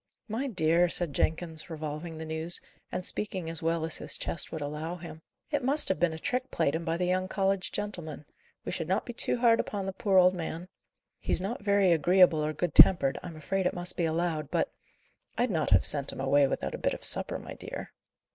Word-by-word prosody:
"My 235 +5 -3
dear," 175 -5 +2
said 170 -4 +2
Jenkins, 160 +3 -2
revolving 160 +1 -6
the 160 - -6
news, 160 +2 0 0.3
and 180 - -3
speaking 185 -5 -1
as 165 - +1
well 165 0 0
as 165 - -1
his - - -4
chest 165 - -2
would 160 - -4
allow 150 +4 -4
him, 165 -2 -10 0.3
"it 290 -3 0
must 280 +4 +4
have 190 - 0
been 175 -1 +2
a 160 - -6
trick 250 +10 -2
played 160 -4 0
him 165 +1 -2
by 165 0 -1
the 180 - -1
young 185 +1 0
college 195 0 -1
gentlemen. 175 -8 -5 0.4
We - - -3
should 160 - -3
not 190 +4 0
be 240 - -6
too 240 - +1
hard 235 -1 +4
upon 200 -2 -3
the 195 - -4
poor 195 0 +1
old 180 0 +6
man. 170 0 -6 0.5
He's - - 0
not 200 +6 -4
very 200 -2 +3
agreeable 170 0 +4
or 155 - -1
good 155 +1 -3
tempered, 140 -8 +6
I'm 170 -2 -8
afraid 180 +5 -1
it - - -3
must 175 0 -1
be 170 - 0
allowed; 160 -3 -1
but - - -1 0.7
I'd 245 0 +1
not 160 -4 0
have 95 -2 +5
sent 140 -2 +4
him - - -9
away 140 +1 +3
without - - -3
a - - -5
bit - - 0
of - - -8
supper, - - +2
my - - -9
dear." - - -8
175 Hz, 220 wpm, -29 LUFS, 160-190 Hz, 0.7 s, old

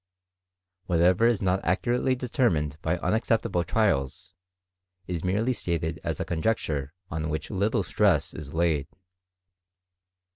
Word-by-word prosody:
Whatever 90 +5 +4
is 115 -4 +1
not 95 0 +1
accurately 120 +8 +1
determined 120 - 0
by' 85 +2 0
unexceptionable 110 -3 +1
trials, 85 - 0 0.7
is 85 -3 -4
merely 105 +7 +1
stated 85 -6 -2
as - - -3
a - - -2
conjecture 80 -5 -1 0.2
on 80 0 -2
which 80 -2 -4
little 100 +2 +1
strras 90 -2 +2
is 75 -2 -8
laid. 80 -4 +1
90 Hz, 115 wpm, -27 LUFS, 80-110 Hz, 0.7 s, Whatever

